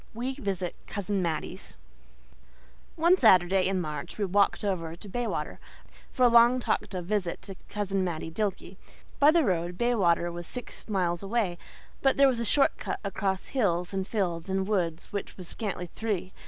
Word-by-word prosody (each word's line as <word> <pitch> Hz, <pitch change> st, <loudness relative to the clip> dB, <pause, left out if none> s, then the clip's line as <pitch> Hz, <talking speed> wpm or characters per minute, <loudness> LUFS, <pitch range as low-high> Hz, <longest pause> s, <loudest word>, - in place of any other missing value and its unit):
WE 250 Hz, +3 st, -2 dB
VISIT 195 Hz, -9 st, -3 dB
COUSIN 200 Hz, -1 st, -2 dB
MATTIE'S 165 Hz, -, -4 dB, 1.2 s
One 340 Hz, +3 st, +5 dB
Saturday 185 Hz, -, +5 dB
in 190 Hz, -1 st, 0 dB
March 150 Hz, -4 st, -5 dB
we 210 Hz, -, 0 dB
walked 200 Hz, +2 st, +2 dB
over 170 Hz, -5 st, -2 dB
to 190 Hz, -, -12 dB
Baywater, 200 Hz, -8 st, -3 dB, 0.5 s
for 255 Hz, -, 0 dB
a -, -, +8 dB
long 235 Hz, +1 st, +6 dB
talked 225 Hz, -, -1 dB
of 180 Hz, -2 st, -4 dB
visit 190 Hz, -3 st, -1 dB
to 195 Hz, 0 st, -8 dB
Cousin 195 Hz, -2 st, -1 dB
Mattie 165 Hz, -2 st, -3 dB
Dilke. 190 Hz, -1 st, -3 dB, 0.4 s
By 290 Hz, -, +7 dB
the 330 Hz, +1 st, +5 dB
road, 175 Hz, -4 st, -1 dB
Baywater 175 Hz, -8 st, +2 dB
was 175 Hz, 0 st, -7 dB
six 250 Hz, -2 st, -8 dB
miles 175 Hz, -4 st, 0 dB
away, 195 Hz, -4 st, -1 dB, 0.4 s
but 270 Hz, -1 st, +3 dB
there 275 Hz, 0 st, +7 dB
was 255 Hz, -3 st, +1 dB
a 235 Hz, -, -1 dB
short 275 Hz, +5 st, +3 dB
cut -, -, -3 dB
across 195 Hz, -1 st, -2 dB
hills 180 Hz, -8 st, 0 dB
and 190 Hz, 0 st, -2 dB
fields 180 Hz, -5 st, -2 dB
and 190 Hz, 0 st, 0 dB
woods 175 Hz, -5 st, -1 dB
which 200 Hz, -, -4 dB
was 180 Hz, -2 st, -7 dB
scantly 195 Hz, -4 st, -4 dB
three. 190 Hz, -1 st, -3 dB
195 Hz, 170 wpm, -28 LUFS, 175-225 Hz, 1.2 s, a